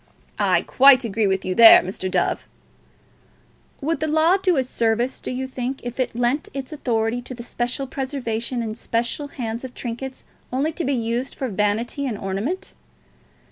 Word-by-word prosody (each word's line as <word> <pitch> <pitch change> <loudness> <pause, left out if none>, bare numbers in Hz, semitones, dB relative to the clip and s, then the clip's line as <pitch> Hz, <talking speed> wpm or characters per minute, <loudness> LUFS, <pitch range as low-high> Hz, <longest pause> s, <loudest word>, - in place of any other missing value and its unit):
"I - - +3
quite 265 -1 +6
agree 220 -1 0
with 190 0 0
you 185 - -1
there, 230 +3 +9
Mr. 185 +1 -4
Dove." 180 -2 0 1.3
"Would 320 +4 -1
the 310 - -1
Law 320 +4 +4
do 370 -4 +1
a 265 - +3
service, 235 +1 0
do - - -5
you 260 +1 -3
think, 260 +1 -4
if 245 +1 -6
it 255 -2 -1
lent 245 +5 0
its 270 +2 -5
authority 235 -4 -1
to 255 +1 -8
the 235 - -8
special 245 +3 -2
preservation 250 -3 -3
in 220 -1 -3
special 235 +5 -2
hands 235 -4 -5
of 255 -1 -8
trinkets 255 +2 -6 0.3
only 275 +5 0
to 330 +1 -4
be 280 - +1
used 235 +2 -2
for 265 - -3
vanity 215 +7 -1
and 225 -5 -3
ornament? 215 - -3
245 Hz, 175 wpm, -22 LUFS, 225-270 Hz, 1.3 s, there